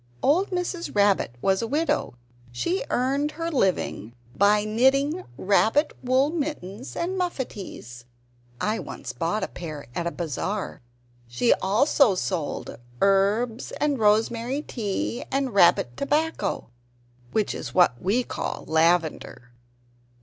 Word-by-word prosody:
Old 355 +8 +3
Mrs. 360 - -3
Rabbit 200 - +3
was 190 -1 +2
a 230 - -2
widow; 295 - 0 0.4
she 355 - -1
earned 275 +4 0
her 330 +1 -3
living 185 - 0 0.2
by 205 +3 +4
knitting 275 +10 +2
rabbit 220 +9 +2
wool 260 +3 +2
mittens 275 - -5
and 360 +3 -2
muffatees 200 - -5 0.5
(I 215 +2 0
once - - -7
bought 170 +6 -1
a - - -1
pair 155 -5 -7
at 170 +5 -2
a - - -1
bazaar). 180 +5 -4 0.5
She 120 - +3
also 215 +3 +3
sold 175 - -3 0.2
herbs, 205 +5 +2
and 290 -3 0
rosemary 230 +6 +2
tea, 190 - -3
and 270 -3 -1
rabbit 170 -10 +4
tobacco 300 - -1 0.6
(which 215 -2 0
is - - -7
what 175 -9 +4
we 215 +7 +1
call - - -5
lavender). 160 -6 +1
215 Hz, 120 wpm, -25 LUFS, 180-280 Hz, 0.6 s, by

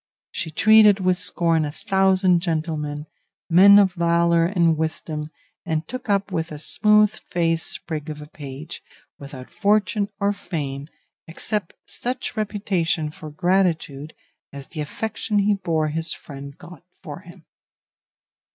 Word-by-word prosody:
She - - -4
treated 215 +4 +6
with 185 -1 +1
scorn 165 -3 +1
a 150 - -3
thousand 190 +1 +2
gentlemen, 155 -3 -3 0.5
men 200 +4 +8
of 195 -3 +4
valour 170 -1 +2
and 170 -3 +2
wisdom, 155 -1 -4 0.3
and 160 -2 -2
took 255 -1 -7
up 200 -1 +1
with 165 -3 -3
a 150 - -6
smooth 210 +7 +3 0.2
faced 165 -2 0
sprig 155 -2 -4
of 150 -1 -6
a 150 - -9
page, 145 +1 -9 0.4
without 140 -2 -10
fortune 205 -1 +1
or 200 +1 +1
fame, 150 -8 -5 0.4
except 190 +3 -4
such 250 +1 -4
reputation 190 -7 -1
for 155 0 -10
gratitude 160 -3 0 0.4
as 140 -1 -9
the 155 - -5
affection 215 +6 -3
he 205 +1 +3
bore 165 -6 -1
his 160 +1 -2
friend 140 0 -10
got 175 0 -13 0.2
for - - -7
him. - - -15
170 Hz, 135 wpm, -22 LUFS, 155-200 Hz, 0.5 s, men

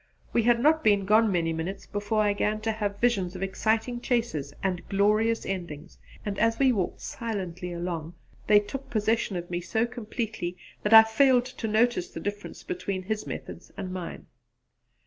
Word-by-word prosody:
We 235 - +4
had 235 +1 +3
not 310 +5 +3
been 205 -2 +3
gone 215 +1 +4
many 165 -3 +1
minutes 175 +5 -4
before 205 +1 0
I 205 -1 +2
began 210 +1 0
to 225 +1 0
have 205 -2 -3
visions 195 -7 +1
of 185 - -4
exciting 220 +5 0
chases 230 - -1
and 185 -2 0
glorious 215 +3 +2
endings, 175 -4 -6 0.3
and 200 -1 -3
as 225 +1 +2
we 270 -2 +4
walked 195 -7 -2
silently 185 -6 -4
along 170 -1 -4 0.3
they 210 -1 +7
took 270 +6 -7
possession 220 -2 0
of 175 0 -5
me 175 0 -1
so 220 +6 0
completely 215 -6 -4 0.2
that 210 - -1
I 220 0 +11
failed 250 +2 +4
to 255 -3 -5
notice 220 -3 +2
the - - -7
difference 205 +3 -6
between 200 - -4
his 215 +2 -3
methods - - -7
and 185 -2 -5
mine. 180 -2 -6
210 Hz, 175 wpm, -27 LUFS, 185-230 Hz, 0.3 s, I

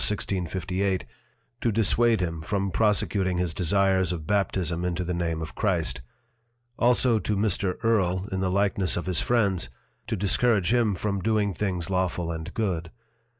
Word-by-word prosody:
1658._ 95 -1 -1 0.6
to 115 - +1
disswade 115 +1 +2
him 85 -2 -2
from 100 +3 -1
prosecuting 100 -2 +1
his 90 -2 -1
desires 95 +1 +2
of 80 -3 -4
Baptism 90 -3 0
into 90 0 -1
the 90 +1 -2
Name 85 -2 -2
of 80 - -7
Christ: 65 - 0 0.8
Also 120 -1 +3
to 105 +1 -1
Mr. 100 -2 0
Earle 95 -4 +1
in 95 - -2
the 95 -1 0
likeness 100 -1 +1
of 85 - -3
his 90 -2 +1
Friends, 100 - +1 0.4
to - - -1
discourage 105 +1 +2
him 115 -5 +2
from 100 +2 -2
doing 105 -1 +1
things 90 -1 -2
lawful 90 -2 0
and 80 -1 -5
good. 90 -7 -1
95 Hz, 150 wpm, -26 LUFS, 90-105 Hz, 0.8 s, Also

